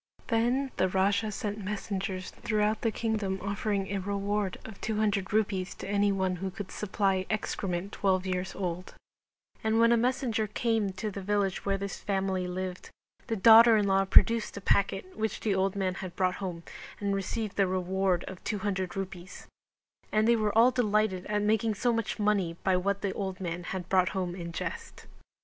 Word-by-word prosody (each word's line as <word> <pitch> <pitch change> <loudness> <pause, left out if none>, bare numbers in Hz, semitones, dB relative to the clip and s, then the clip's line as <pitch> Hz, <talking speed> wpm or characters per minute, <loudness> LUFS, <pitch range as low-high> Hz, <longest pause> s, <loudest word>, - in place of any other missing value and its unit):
Then 250 +4 +1
the 185 - +3
Raja 200 +3 +1
sent 205 +1 -4
messengers 195 -2 -3
throughout 215 -1 0
the 230 - +2
kingdom 215 -4 -1
offering 200 0 -1
a 200 0 -1
reward 200 0 -2
of 220 -3 -10
200 210 -3 0
Rupees 200 -3 0
to - - -8
any 205 0 +2
one 190 -2 0
who 190 +2 -3
could 195 0 -7
supply 195 -2 0
excrement 195 -3 -2
twelve 190 -2 +1
years 185 0 -2
old; 180 -1 -4 0.7
and 220 +1 +2
when 230 0 +5
a 235 - +5
messenger 235 -2 0
came 220 -1 0
to 210 +3 -4
the 200 - -6
village 200 0 -1
where 195 0 +2
this 200 0 -5
family 190 -2 -1
lived 185 0 -5 0.4
the 225 - -1
daughter 225 +2 +8
in 205 - +2
law 195 0 +3
produced 230 +3 +4
the - - -4
packet 200 - 0
which 220 -1 -2
the 210 - +1
old 190 +1 +1
man 190 -2 0
had 185 -2 -7
brought 185 -1 +1
home 175 -3 -4 0.4
and 200 -1 0
received 195 +2 -3
the 195 -1 +3
reward 185 0 0
of 190 -1 -9
200 195 -3 -2
Rupees; 185 -1 -6 0.7
and 215 +1 +3
they 235 - +5
were 215 -1 0
all 240 +3 +7
delighted 215 -6 +1
at 210 0 0
making 220 +1 +2
so 240 +3 +1
much 230 -2 -2
money 200 -5 +1
by 190 - +3
what 200 +2 0
the 195 -2 -1
old 190 -2 -4
man 175 -1 -4
had 185 -2 -4
brought 185 -1 +3
home 180 -2 -1
in 170 -2 -6
jest. 170 - -6
200 Hz, 180 wpm, -29 LUFS, 185-215 Hz, 0.7 s, daughter